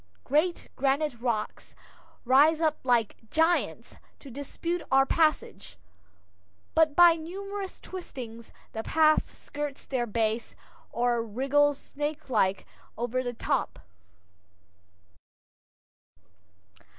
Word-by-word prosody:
Great 315 +5 0
granite 280 +2 +1
rocks 230 -3 -3 0.5
rise 290 +6 +5
up 315 -2 +1
like 240 -4 +1
giants 325 +2 0 0.2
to 275 - -13
dispute 330 +6 -4
our 270 0 +5
passage, 305 - 0 1.0
but 315 -2 +3
by 345 0 +8
numerous 390 +4 -6
twistings 240 -11 -9 0.2
the 220 - -4
path 310 +5 +2
skirts 290 -1 -6
their 245 -3 -2
base, 220 +1 -1 0.4
or 240 0 +1
wriggles 275 +6 0
snakelike 265 -9 -1 0.3
over 245 +2 -1
the 245 -1 -4
top. 275 +3 -1
280 Hz, 90 wpm, -28 LUFS, 240-315 Hz, 1.0 s, by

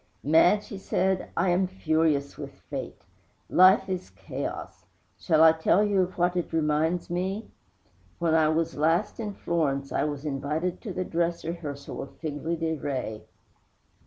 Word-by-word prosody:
'Madge,' 175 +7 +4
he 200 - -6
said, 190 -1 0
'I 180 +2 +2
am 185 +2 +2
furious 160 -5 0
with - - -8 0.2
Fate. - - -6 0.5
Life 190 +2 +6
is 185 -1 -4
chaos. - - -7 0.3
Shall 160 -3 +4
I 160 - +9
tell 160 +5 +3
you 200 -2 +2
of 185 0 -3
what 175 0 +2
it 175 - -2
reminds 160 +2 0
me? 190 +5 -3 0.7
When 170 -2 +1
I 160 -1 +4
was 165 +1 0
last 165 +10 +1
in 210 -3 -4
Florence 140 -5 -1
I - - +1
was 145 -1 -4
invited 150 +5 -2
to 215 - -6
the 185 0 -3
dress 170 -1 -1
rehearsal 155 -4 -5
of 135 - -10
"Figli 160 +1 -3
Di 165 -1 0
Re." 130 -8 -4
165 Hz, 160 wpm, -27 LUFS, 155-180 Hz, 0.7 s, I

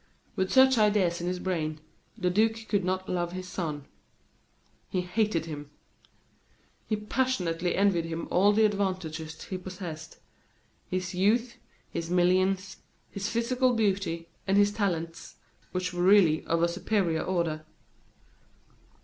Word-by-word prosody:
With 190 0 -1
such 265 -2 +6
ideas 205 -5 +2
in 175 - -3
his 180 0 -1
brain, 160 -4 -2 0.4
the 180 -4 0
duke 220 +3 +1
could 200 -3 +1
not 185 +1 -1
love 175 -1 -2
his 185 0 -6
son. 155 -6 -4 1.0
He 185 - 0
hated 180 -2 0
him. 145 -3 -7 1.2
He 215 - +1
passionately 200 -7 -1
envied 190 -4 +2
him 165 0 -4
all 195 +3 +5
the 215 +1 +4
advantages 185 -6 -2
he 185 - -5
possessed 180 -4 -8 0.7
his 185 -1 -2
youth, 225 +6 +1 0.3
his 165 0 -4
millions, 185 +2 +2 0.3
his 200 +1 -3
physical 250 +2 +1
beauty, 195 -6 0 0.2
and 195 +1 +3
his 205 0 +5
talents, 170 -6 -3 0.4
which 180 0 -2
were 175 - -2
really 180 -4 +5
of 165 0 +1
a - - +5
superior 175 -2 0
order. 170 -4 -1
185 Hz, 130 wpm, -28 LUFS, 170-205 Hz, 1.2 s, such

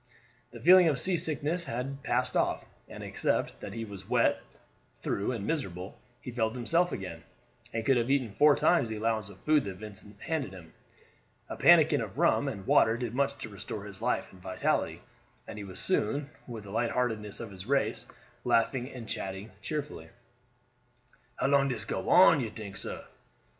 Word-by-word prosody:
The 120 0 -11
feeling 180 +6 +7
of 150 -4 +2
seasickness 165 -1 0
had 135 +3 -4
passed - - 0
off, - - +1 0.2
and - - -8
except - - -1
that - - -7
he 115 0 -4
was 100 -3 -10
wet - - +3 0.6
through 100 +5 -1
and 110 -5 -4
miserable, 95 - -4 0.2
he 125 - -7
felt 115 -1 -1
himself 165 +9 +1
again, 90 -4 -6 0.5
and 115 -1 -3
could 135 0 +4
have 120 +1 0
eaten 135 -5 +1
four 145 +6 +5
times 170 -10 +3
the 110 - -3
allowance 110 -1 -1
of 100 - -13
food 155 -2 +3
that 95 -2 -5
Vincent 105 0 -11
handed 155 - -2
him. 85 -4 -12 0.8
A - - -4
pannikin - - +6
of - - -6
rum - - +3
and 95 -1 -5
water 110 +1 +4
did 120 -2 -4
much 140 +1 0
to - - -6
restore 100 0 -7
his 100 -2 -10
life - - -1
and 90 - -15
vitality, 95 0 -1 0.4
and 105 - -7
he - - -6
was 95 -2 -4
soon, 145 - 0 0.2
with 115 -4 -7
the 100 - -10
light 115 +2 0
heartedness 110 -5 -2
of 115 -3 -7
his 95 +1 -9
race, 140 0 0 0.4
laughing 125 +2 +1
and 120 -4 -9
chatting 95 +2 -5
cheerfully. 150 -1 -5 1.3
"How - - -2
long 140 0 +4
dis 115 -5 -3
go - - -3
on, 170 -4 +7
you 115 - -2
tink, 105 -2 -8
sah?" - - -5
115 Hz, 180 wpm, -30 LUFS, 100-140 Hz, 1.3 s, feeling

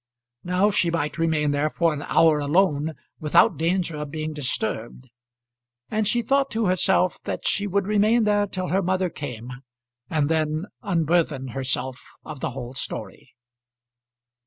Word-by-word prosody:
Now 180 +4 +2
she 175 -3 +2
might 165 -1 -2
remain 155 -3 +1
there 145 +2 +1
for 165 0 +1
an 145 - -5
hour 160 -2 +4
alone 150 0 +1 0.2
without 150 -1 +4
danger 170 -1 0
of 150 -1 -5
being 155 +1 -4
disturbed; 125 -3 -3 0.8
and 215 -1 +1
she 240 +2 +2
thought 275 +3 +2
to 225 0 0
herself 185 0 +2
that - - -4
she 205 +1 +1
would 200 0 0
remain 215 +3 +3
there 205 -1 +2
till 185 -1 -4
her 190 +2 +2
mother 185 -1 0
came, 125 -6 -7 0.6
and 150 -3 +1
then 155 +1 0 0.2
unburthen 165 - 0
herself 130 0 -2 0.2
of 155 -3 -8
the - - -2
whole 125 -1 -7
story. 125 - -5
160 Hz, 150 wpm, -24 LUFS, 145-190 Hz, 0.8 s, hour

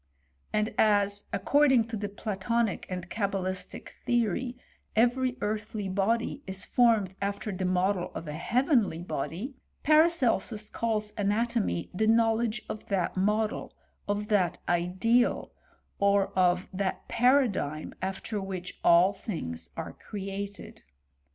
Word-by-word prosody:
And 215 +1 0
as, 205 -1 +3
according 280 -5 +4
to 225 - -3
the 205 -1 -3
Platonic 210 +1 -1
and 180 -2 -4
Cabalistic 190 -2 -3
theory, 240 +1 0 0.4
every 245 +3 +2
earthly 210 -1 -2
body 225 +8 0
is 190 0 -4
formed 225 -6 +3
after 200 +1 -2
the 185 -1 -3
model 185 0 +1
of 165 - -6
a 150 - -4
heavenly 230 - +1
body, 175 - -4 0.3
Paracelsus 275 - +3
calls 215 -2 -1
ana^ 205 +4 +2
tomy 230 -8 -1
the 215 +4 +1
knowledge 225 0 +2
of 215 - -6
that 190 -4 0
model, 210 +3 0 0.3
of 205 +1 -2
that 185 -5 +2
ideal, 185 +8 +2 0.5
or 200 -1 +3
of 180 +1 +2
that 190 0 -2
paradigm 235 - +2
after 195 +2 -3
which 185 -2 -6
all 175 +3 +6
things 160 - -5
are - - -5
create4. 200 0 -7
205 Hz, 120 wpm, -29 LUFS, 185-230 Hz, 0.5 s, all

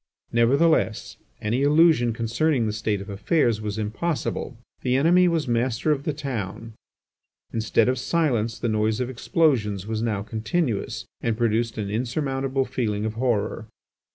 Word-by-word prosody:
Nevertheless, 125 +1 +2 0.3
any 115 +5 0
illusion 150 -4 +4
concerning 115 +4 0
the 105 - -1
state 105 -2 -1
of 100 - -9
affairs 110 +2 +1
was 105 0 -4
impossible. 125 +3 -3 0.2
The 125 0 +1
enemy 175 +6 +5
was 165 -4 0
master 120 +4 +1
of 140 -2 -1
the - - +1 0.2
town. 115 -2 -5 0.8
Instead 110 0 +2
of 130 0 +1
silence 120 -7 0
the 115 - -2
noise 110 0 +1
of 125 0 -2
explosions 115 - +1
was 110 0 -3
now 105 -4 -1
continuous 110 - -2 0.2
and 115 -2 -1
produced 115 0 0
an 100 -2 -3
insurmountable 135 +3 -1
feeling 110 -5 -2
of 110 - -2
horror. 115 -2 -1
115 Hz, 145 wpm, -24 LUFS, 110-135 Hz, 0.8 s, enemy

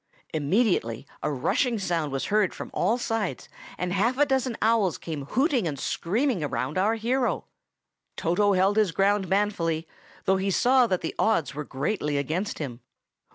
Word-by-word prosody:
Immediately 155 - +1 0.2
a 150 - -1
rushing 195 - +1
sound 170 -7 -1
was 135 0 -2
heard 210 -3 +2
from - - -7
all 230 - +1
sides, 225 -5 -2 0.3
and 180 0 -2
half 230 +6 +1
a 290 - +5
dozen 265 -4 0
owls 215 - +2
came 145 +1 -5
hooting 260 - +1
and 145 -3 -3
screaming 205 - 0
around 140 0 -2
our 215 +4 +2
hero. 245 +3 0 0.7
Toto 200 +5 +2
held 195 +3 +3
his 210 -5 +3
ground 195 +2 +2
manfully, 170 -5 0 0.4
though 190 0 +3
he 195 +1 -1
saw 250 +5 +4
that 185 -4 0
the 160 - -3
odds 190 -10 +2
were 150 +2 -4
greatly 150 +2 -2
against 160 +9 -2
him. 125 -6 -5
190 Hz, 160 wpm, -26 LUFS, 155-225 Hz, 0.7 s, a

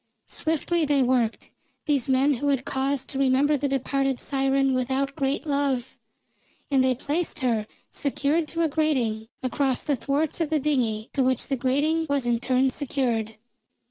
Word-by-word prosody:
Swiftly 325 +1 -1
they 285 -3 +3
worked, 245 -3 0 0.3
these 280 -5 0
men 265 +2 +3
who 280 +3 -2
had 275 -2 +1
cause 270 0 -1
to 270 - -5
remember 275 +2 +3
the 285 0 -1
departed 270 0 0
siren 270 -1 +1
without 265 +2 -1
great 275 0 -1
love, 280 -4 -1 0.8
and 270 -2 +4
they 260 -1 +2
placed 300 +4 -2
her, 225 -4 0 0.2
secured 295 +3 0
to 335 +2 -1
a - - +3
grating, 260 -8 0 0.2
across 260 0 0
the 290 - +1
thwarts 285 +6 -1
of 320 - 0
the 315 -1 +1
dingey, 245 -7 -1
to 275 - +1
which 260 -1 0
the 275 - +1
grating 290 +6 +1
was 280 -3 +1
in 240 -1 +1
turn 260 +2 +2
secured. 240 -6 -1
270 Hz, 165 wpm, -25 LUFS, 255-290 Hz, 0.8 s, and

